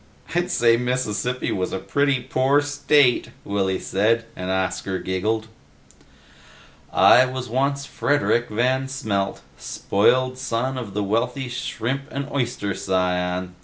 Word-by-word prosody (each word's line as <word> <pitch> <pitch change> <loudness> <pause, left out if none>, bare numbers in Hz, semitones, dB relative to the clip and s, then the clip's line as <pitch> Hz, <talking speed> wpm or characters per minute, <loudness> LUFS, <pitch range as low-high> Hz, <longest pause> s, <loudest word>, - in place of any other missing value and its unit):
"I'd 175 +1 0
say 115 -1 +4
Mississippi 125 -1 -1
was 95 -1 -2
a - - -2
pretty 140 +3 +1
poor 130 +3 +2
state," 145 -2 +3 0.2
Willy 95 -2 0
said, 115 +4 +1
and 90 0 -5
Oscar 95 0 -1
giggled. 105 +5 -1 1.5
"I 125 - +7
once 130 0 -5
was 140 +3 0
Frederik 140 -6 +1
Van 130 +4 +1
Smelt, 100 -7 -2 0.2
spoiled 130 +5 +1
son 130 +1 -1
of 105 -6 -7
the 105 - 0
wealthy 115 +6 -1
shrimp 125 +2 -3
and 140 0 -4
oyster 120 -7 -1
scion. 90 -1 -1
120 Hz, 125 wpm, -23 LUFS, 100-130 Hz, 1.5 s, I